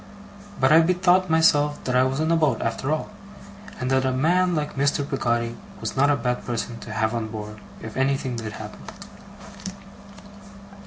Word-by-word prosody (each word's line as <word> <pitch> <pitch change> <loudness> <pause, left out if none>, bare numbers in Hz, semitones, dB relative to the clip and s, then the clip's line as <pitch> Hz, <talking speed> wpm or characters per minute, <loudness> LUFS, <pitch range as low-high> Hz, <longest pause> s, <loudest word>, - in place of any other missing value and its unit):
But 130 +1 +4
I 160 - +8
bethought 180 +1 +3
myself 150 -2 +3
that 125 - -1
I 125 - +5
was 135 +2 -1
in 160 +1 +1
a - - +4
boat, 150 -8 +2
after 115 +4 -2
all; 155 +6 -2 0.7
and 130 0 -2
that 130 0 +3
a 130 - +1
man 175 +7 +2
like 150 -1 -2
Mr. 140 +1 +1
Peggotty 120 -4 -1 0.2
was - - -4
not 140 +2 +4
a 145 - +4
bad 125 -1 -2
person 120 0 -4
to 110 - -9
have 110 +1 0
on 115 -2 -2
board 105 -1 -7 0.2
if 110 -1 -7
anything 130 -1 0
did 110 -2 -5
happen. 105 0 -9
130 Hz, 175 wpm, -24 LUFS, 115-155 Hz, 0.7 s, I